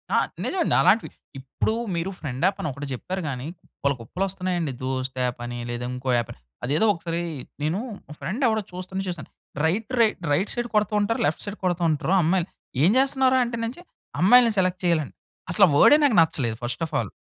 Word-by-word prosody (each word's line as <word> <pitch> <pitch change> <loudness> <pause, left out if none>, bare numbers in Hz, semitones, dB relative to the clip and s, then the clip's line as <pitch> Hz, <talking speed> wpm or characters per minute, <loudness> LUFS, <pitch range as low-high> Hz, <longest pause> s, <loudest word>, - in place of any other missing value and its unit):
ఆ! - - +5 0.3
నిజమండి 365 -3 +1
అలాంటివి. 225 - +3 0.3
ఇప్పుడు 135 +11 -2 0.2
మీరు 170 +3 -2
ఫ్రెండ్ 135 -2 -5
యాపని 195 -3 0
ఒకటి 140 +2 -7
చెప్పారు 185 +9 -4
గాని, 130 +2 -5 0.2
కుప్పలు, 140 -1 -2
కుప్పలు 115 +12 -4
వొస్తున్నాయండి. 180 -5 -2
దోస్ట్ 130 0 -3
యాపని, 120 0 -4
లేదా 120 +1 -4
ఇంకో 125 +1 -4
యాప్ 120 - -2
అని, - - -13 0.2
అదేదో 150 - +2
ఒకసారి 170 -1 -3 0.4
నేను 160 +6 0 0.3
మా 150 - -9
ఫ్రెండ్ 215 +10 -3
ఎవడో 220 -1 +1
చూస్తుంటే 185 +2 -5
చూసాను. 170 -5 -6 0.4
Right, 205 +7 0
right, 220 -4 +3
right 175 +8 +2
side 240 0 -2
కొడుతుంటారు, 210 +1 +1
left 150 +2 -1
side 205 +1 -6
కొడుతుంటారు 170 -1 +1
అమ్మాయిలు 175 +2 +1 0.4
ఏం 175 - +6
జేస్తున్నావు 265 -1 +3
రా? - - +4
అంటే 235 0 -4
నుంచి, 250 +9 -6 0.4
"అమ్మాయిల్ని 235 +5 +7
సెలెక్ట్ 185 -1 +1
చేయాలని" 165 -5 +1 0.4
అసలా 195 +2 +7
వర్డే 290 - +7
నాకు 255 -8 +3
నచ్చలేదు, 135 -8 0
ఫస్ట్ 120 +3 -4
ఆఫ్ 160 - -11
ఆల్. - - -1
175 Hz, 180 wpm, -24 LUFS, 140-210 Hz, 0.4 s, అమ్మాయిల్ని